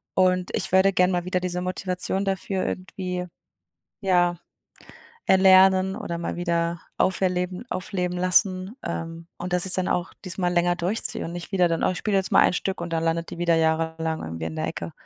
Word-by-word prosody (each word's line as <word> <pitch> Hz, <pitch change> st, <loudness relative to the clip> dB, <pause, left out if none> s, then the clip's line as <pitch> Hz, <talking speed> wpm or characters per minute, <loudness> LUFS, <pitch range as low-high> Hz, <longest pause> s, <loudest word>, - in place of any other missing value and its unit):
Und 185 Hz, -1 st, +2 dB
ich -, -, -3 dB
würde 190 Hz, +1 st, +5 dB
gerne 180 Hz, 0 st, +3 dB
mal 175 Hz, -1 st, 0 dB
wieder 185 Hz, 0 st, 0 dB
diese 180 Hz, 0 st, -3 dB
Motivation 185 Hz, +1 st, -2 dB
dafür 190 Hz, 0 st, -2 dB
irgendwie, 180 Hz, -1 st, -4 dB, 0.7 s
ja, 175 Hz, -3 st, +2 dB, 0.9 s
erlernen 190 Hz, 0 st, +5 dB
oder 170 Hz, 0 st, -4 dB
mal 170 Hz, -, -4 dB
wieder 170 Hz, -1 st, -1 dB, 0.2 s
auf 190 Hz, -, +2 dB
erleben 180 Hz, +1 st, -1 dB
aufleben 180 Hz, -1 st, -2 dB
lassen, 185 Hz, +3 st, +2 dB
ähm, 165 Hz, 0 st, -5 dB
und 180 Hz, 0 st, -5 dB
dass 180 Hz, +1 st, +2 dB
ich's 190 Hz, -, +1 dB
dann 185 Hz, 0 st, 0 dB
auch 175 Hz, +1 st, -1 dB
diesmal 180 Hz, -1 st, -1 dB
länger 175 Hz, 0 st, +2 dB
durchziehe 190 Hz, +6 st, -1 dB
und 165 Hz, -, -5 dB
nicht 175 Hz, 0 st, -7 dB
wieder 185 Hz, -2 st, +4 dB
dann: 165 Hz, -, -1 dB
„Oh, -, -, +3 dB
ich 180 Hz, -, -4 dB
spiele 210 Hz, -2 st, 0 dB
jetzt 190 Hz, -, -1 dB
mal -, -, +7 dB
ein -, -, +4 dB
Stück“ 190 Hz, 0 st, -2 dB
und 170 Hz, -1 st, -5 dB
dann 165 Hz, -, 0 dB
landet 165 Hz, 0 st, -1 dB
die -, -, -8 dB
wieder 170 Hz, -1 st, +2 dB
jahrelang 160 Hz, 0 st, 0 dB
irgendwie 80 Hz, 0 st, -5 dB
in 80 Hz, -, -5 dB
der 80 Hz, -, -2 dB
Ecke. -, -, -5 dB
180 Hz, 195 wpm, -24 LUFS, 170-185 Hz, 0.9 s, mal